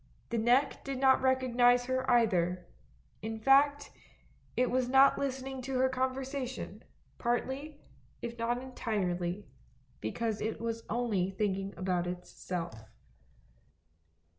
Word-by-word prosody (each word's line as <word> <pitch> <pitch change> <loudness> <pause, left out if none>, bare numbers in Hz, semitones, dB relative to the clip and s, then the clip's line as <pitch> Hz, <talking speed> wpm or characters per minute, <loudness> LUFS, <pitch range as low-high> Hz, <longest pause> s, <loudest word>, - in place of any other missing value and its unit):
The 235 - +1
bottle 220 - -2 0.2
neck 280 - -12
did 275 -1 -4
not 265 0 +4
recognise 245 -2 +3
her 260 0 -1
either, 180 -7 +2 0.6
in 220 +1 -4
fact 285 +4 +4 0.7
it 250 0 +2
was 250 0 +1
not 270 +1 +6
listening 265 -1 -3
to 265 +1 -3
her 260 +1 +3
conversation, 260 0 -3 0.4
partly, 265 +5 -2 0.4
if 235 0 -6
not 235 +1 0
entirely, 200 -7 -2 0.5
because 215 - -2
it 220 +1 -2
was 230 0 -3
only 215 -6 0
thinking 195 0 -2
about 180 -1 0
itself. 175 -7 -5
240 Hz, 115 wpm, -31 LUFS, 200-260 Hz, 0.7 s, not